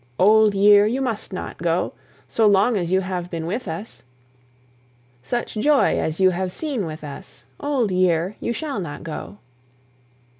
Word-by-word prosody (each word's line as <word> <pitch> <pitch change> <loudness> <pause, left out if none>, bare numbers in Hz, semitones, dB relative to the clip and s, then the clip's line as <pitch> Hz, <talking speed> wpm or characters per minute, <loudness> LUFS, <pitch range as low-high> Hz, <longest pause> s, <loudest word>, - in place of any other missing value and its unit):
Old 215 +1 +5
year, 205 +1 +6
you 245 +5 -1
must 235 -5 -3
not - - -6
go; - - 0 0.3
So 225 -2 +2
long 205 +4 +4
as 175 -3 -2
you 190 0 +3
have 180 -2 -4
been 165 -2 -4
with 210 +7 -3
us, 175 +7 -7 1.2
Such 240 - -3
joy 285 +6 +3
as 160 +2 -2
you 185 -1 +5
have 185 +1 -2
seen 260 - -3
with 155 0 -8
us, 150 +6 -10
Old 270 -8 0
year, 180 +1 +1
you - - -2
shall 280 -1 -3
not 160 -6 -6
go. 165 +5 -7
195 Hz, 160 wpm, -22 LUFS, 175-225 Hz, 1.2 s, year